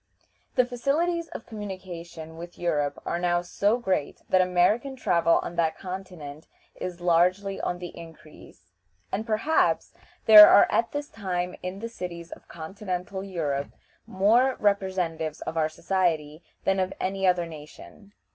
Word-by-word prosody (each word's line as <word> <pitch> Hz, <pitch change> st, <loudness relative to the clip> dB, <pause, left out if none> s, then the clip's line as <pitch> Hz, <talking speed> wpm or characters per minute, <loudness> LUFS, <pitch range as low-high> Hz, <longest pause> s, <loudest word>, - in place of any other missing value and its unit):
The 250 Hz, -, +4 dB
facilities 315 Hz, +8 st, -1 dB
of -, -, -9 dB
communication 180 Hz, -6 st, -8 dB
with 170 Hz, +1 st, -10 dB
Europe 150 Hz, -5 st, -1 dB
are 170 Hz, -, -2 dB
now 175 Hz, 0 st, +1 dB
so 205 Hz, +5 st, +1 dB
great 190 Hz, -11 st, -2 dB
that 185 Hz, -, +5 dB
American 185 Hz, +9 st, +2 dB
travel 170 Hz, -8 st, +2 dB
on 170 Hz, -, -7 dB
that 160 Hz, -2 st, +1 dB
continent 180 Hz, -5 st, -8 dB, 0.3 s
is 180 Hz, -1 st, -6 dB
largely 180 Hz, +3 st, +2 dB
on 175 Hz, -, -2 dB
the 175 Hz, 0 st, -8 dB
increase, 155 Hz, -, -14 dB, 0.4 s
and 220 Hz, +4 st, -3 dB
perhaps 225 Hz, +9 st, +1 dB, 0.3 s
there 210 Hz, -1 st, +11 dB
are -, -, +7 dB
at 230 Hz, -, +1 dB
this 290 Hz, 0 st, -4 dB
time 180 Hz, -4 st, -3 dB
in 185 Hz, +1 st, -5 dB
the 230 Hz, -, -3 dB
cities 175 Hz, -6 st, -7 dB
of -, -, -11 dB
continental 185 Hz, +2 st, -5 dB
Europe 150 Hz, -8 st, -3 dB, 0.3 s
more 235 Hz, +7 st, +3 dB
representatives 185 Hz, -6 st, -1 dB
of -, -, -5 dB
our 155 Hz, -1 st, +1 dB
society 160 Hz, -3 st, -1 dB, 0.2 s
than 195 Hz, 0 st, +1 dB
of 185 Hz, 0 st, -1 dB
any 195 Hz, 0 st, -1 dB
other 180 Hz, -1 st, +2 dB
nation. 165 Hz, +6 st, -13 dB
180 Hz, 145 wpm, -26 LUFS, 170-205 Hz, 0.4 s, there